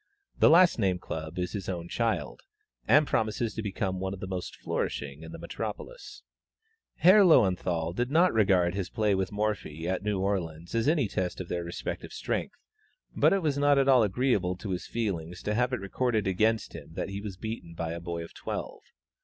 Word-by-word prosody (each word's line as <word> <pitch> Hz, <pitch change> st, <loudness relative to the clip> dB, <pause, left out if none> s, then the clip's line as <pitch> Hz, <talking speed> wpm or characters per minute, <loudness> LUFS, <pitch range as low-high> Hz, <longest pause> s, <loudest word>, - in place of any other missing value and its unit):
The -, -, +7 dB
last 170 Hz, -2 st, +6 dB
named 95 Hz, -4 st, +1 dB
club 80 Hz, -2 st, -6 dB
is 90 Hz, 0 st, -2 dB
his 100 Hz, -3 st, -5 dB
own 85 Hz, -2 st, -4 dB
child, 115 Hz, +4 st, -2 dB, 0.5 s
and 150 Hz, +1 st, +6 dB
promises 110 Hz, -2 st, 0 dB
to -, -, -4 dB
become 95 Hz, -2 st, -2 dB
one 95 Hz, +1 st, -3 dB
of -, -, -13 dB
the -, -, -5 dB
most 95 Hz, -1 st, -5 dB
flourishing 70 Hz, +1 st, -3 dB
in 80 Hz, 0 st, -9 dB
the -, -, -7 dB
metropolis. -, -, -7 dB, 0.7 s
Herr 190 Hz, +5 st, +7 dB
Löwenthal 90 Hz, -, +3 dB
did 120 Hz, +3 st, 0 dB
not 170 Hz, +5 st, +4 dB
regard 95 Hz, -5 st, +3 dB
his 95 Hz, -1 st, -3 dB
play 105 Hz, -2 st, +1 dB
with 95 Hz, -1 st, -1 dB
Morphy 105 Hz, -7 st, -2 dB
at 95 Hz, 0 st, -1 dB
New 105 Hz, -1 st, -1 dB
Orleans 85 Hz, -3 st, -2 dB
as 115 Hz, +1 st, +1 dB
any 150 Hz, -6 st, +3 dB
test 95 Hz, -2 st, -3 dB
of 95 Hz, -, -6 dB
their 85 Hz, -1 st, -2 dB
respective 85 Hz, 0 st, -5 dB
strength, -, -, -3 dB, 0.6 s
but -, -, +4 dB
it 195 Hz, -2 st, +1 dB
was 145 Hz, -3 st, 0 dB
not 145 Hz, 0 st, +4 dB
at 135 Hz, 0 st, +3 dB
all 130 Hz, -3 st, +6 dB
agreeable 105 Hz, -4 st, +1 dB
to 95 Hz, +2 st, -6 dB
his 90 Hz, -2 st, -3 dB
feelings 90 Hz, -7 st, -3 dB
to 105 Hz, -, -1 dB
have 125 Hz, +3 st, +1 dB
it 125 Hz, -, -1 dB
recorded 110 Hz, +2 st, -1 dB
against 110 Hz, +3 st, +1 dB
him 80 Hz, -, -10 dB
that -, -, -3 dB
he 100 Hz, +1 st, -5 dB
was 100 Hz, -3 st, -6 dB
beaten 110 Hz, -6 st, -6 dB
by 80 Hz, 0 st, -3 dB
a 85 Hz, -, -4 dB
boy 85 Hz, -1 st, -4 dB
of 85 Hz, -, -11 dB
twelve. -, -, -5 dB
100 Hz, 200 wpm, -28 LUFS, 90-115 Hz, 0.7 s, The